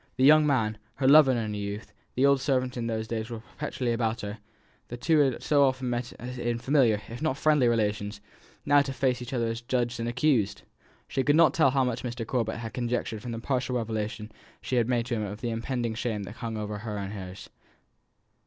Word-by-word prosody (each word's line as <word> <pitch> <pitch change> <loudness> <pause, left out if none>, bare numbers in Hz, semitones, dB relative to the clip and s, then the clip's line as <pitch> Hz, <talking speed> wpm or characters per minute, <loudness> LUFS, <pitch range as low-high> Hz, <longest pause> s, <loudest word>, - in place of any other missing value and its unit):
The 130 - 0
young 150 +2 +7
man, 110 -6 +1 0.2
her 130 - 0
lover 145 -1 +8
in 125 - +1
her 115 -2 -2
youth, 100 +1 -5 0.2
the 130 - +3
old 140 -1 +4
servant 130 -2 0
who 125 - -5
in 115 - -2
those 110 -1 -2
days 110 0 -3
was 115 -2 -7
perpetually 130 -5 -2
about 115 0 -1
her 105 +2 -6 0.5
the 120 - -6
two 160 +6 +2
who 140 -2 +5
had - - -9
so 145 -1 +4
often 130 -2 +1
met 120 0 -3
in 120 -1 -3
familiar 120 -5 +2
if 120 +2 -8
not 155 -4 0
friendly 150 -4 +3
relations, 105 -2 0 0.5
now 145 0 +5
to 135 -1 -3
face 130 -1 0
each 125 - -7
other 120 -3 0
as 115 0 -3
judge 120 -1 -1
and 115 +1 -1
accused! 120 -6 +1 0.4
She 135 - -1
could 145 +2 +3
not 160 -4 +6
tell 155 -5 +4
how 135 0 +2
much 125 -1 -1
Mr. 120 -1 -4
Corbet 115 -2 -1
had 115 -1 -6
conjectured 120 -3 -2
from 120 - -6
the 115 - -4
partial 125 +1 -1
revelation 110 -1 -3 0.3
she 130 - -2
had 120 0 +2
made 120 -2 +1
to 125 - -3
him 110 - -1
of 105 +1 -6
the 120 - -2
impending 115 0 -2
shame 110 -2 -2
that 105 +3 -9
hung 115 -2 -4
over 105 -1 -4
her 105 -1 -5
and 100 0 -4
hers. 95 -1 -8
120 Hz, 225 wpm, -27 LUFS, 110-130 Hz, 0.5 s, lover